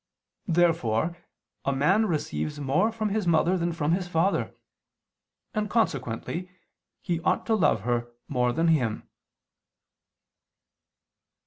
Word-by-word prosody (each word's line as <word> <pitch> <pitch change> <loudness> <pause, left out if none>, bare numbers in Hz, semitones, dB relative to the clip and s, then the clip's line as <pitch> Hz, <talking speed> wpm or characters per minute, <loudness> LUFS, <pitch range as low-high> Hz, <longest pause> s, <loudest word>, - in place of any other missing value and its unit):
Therefore 165 - +2 0.5
a 140 - +1
man 185 +11 +3
receives 80 - -2
more 150 +11 +2
from 220 -1 -2
his 205 -2 -1
mother 170 +2 +3
than 170 -1 0
from 160 -2 -1
his 180 +1 0
father: 175 +3 0 1.0
and 215 -1 -1
consequently 170 - -1 0.5
he 175 -3 -1
ought 180 - +1
to 225 - +1
love 165 - +3
her 120 +1 -1 0.2
more 125 -3 +1
than 165 +6 +1
him. 125 -9 +1
165 Hz, 115 wpm, -27 LUFS, 130-185 Hz, 1.0 s, man